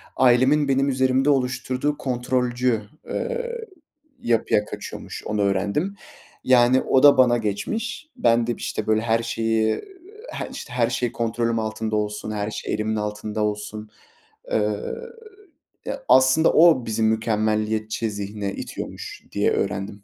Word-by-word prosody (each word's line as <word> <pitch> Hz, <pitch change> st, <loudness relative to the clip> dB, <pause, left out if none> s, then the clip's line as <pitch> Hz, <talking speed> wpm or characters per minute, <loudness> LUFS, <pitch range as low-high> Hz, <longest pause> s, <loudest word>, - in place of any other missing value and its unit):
ailemin 130 Hz, +4 st, +4 dB
benim 135 Hz, +1 st, +2 dB
üzerimde 130 Hz, +1 st, +2 dB
oluşturduğu 130 Hz, +1 st, 0 dB
kontrolcü, 125 Hz, -2 st, 0 dB, 0.3 s
eee, 480 Hz, -1 st, -3 dB, 0.5 s
yapıya 110 Hz, -2 st, +1 dB
kaçıyormuş, -, -, -8 dB
onu 105 Hz, -1 st, -1 dB
öğrendim. 100 Hz, -, 0 dB, 0.5 s
Yani, 125 Hz, 0 st, +5 dB
o 130 Hz, -, +2 dB
da 145 Hz, -2 st, +8 dB
bana 120 Hz, -2 st, +5 dB
geçmiş. 215 Hz, -, -3 dB
Ben 115 Hz, -1 st, +2 dB
de 120 Hz, -, +1 dB
işte 110 Hz, -, -4 dB
böyle 110 Hz, 0 st, +3 dB
her 115 Hz, 0 st, +1 dB
şeyi, 115 Hz, -1 st, 0 dB, 0.5 s
he -, -, -5 dB
işte 130 Hz, -, -8 dB
her 120 Hz, -2 st, +2 dB
şey 120 Hz, 0 st, -1 dB
kontrolüm 115 Hz, 0 st, -1 dB
altında 110 Hz, 0 st, -2 dB
olsun, 105 Hz, 0 st, -2 dB
her 105 Hz, 0 st, -3 dB
şey -, -, -4 dB
elimin 110 Hz, +1 st, -1 dB
altında 105 Hz, 0 st, -3 dB
olsun, 105 Hz, 0 st, -4 dB, 0.6 s
eee, 105 Hz, -1 st, 0 dB, 1.1 s
e, -, -, -1 dB, 0.2 s
aslında 130 Hz, +5 st, +5 dB
o 160 Hz, -7 st, +6 dB
bizi 110 Hz, 0 st, -1 dB
mükemmeliyetçi 110 Hz, 0 st, 0 dB
zihne 100 Hz, 0 st, -4 dB
itiyormuş -, -, -7 dB
diye -, -, +1 dB
öğrendim. 100 Hz, +1 st, -2 dB
115 Hz, 130 wpm, -23 LUFS, 110-130 Hz, 1.1 s, da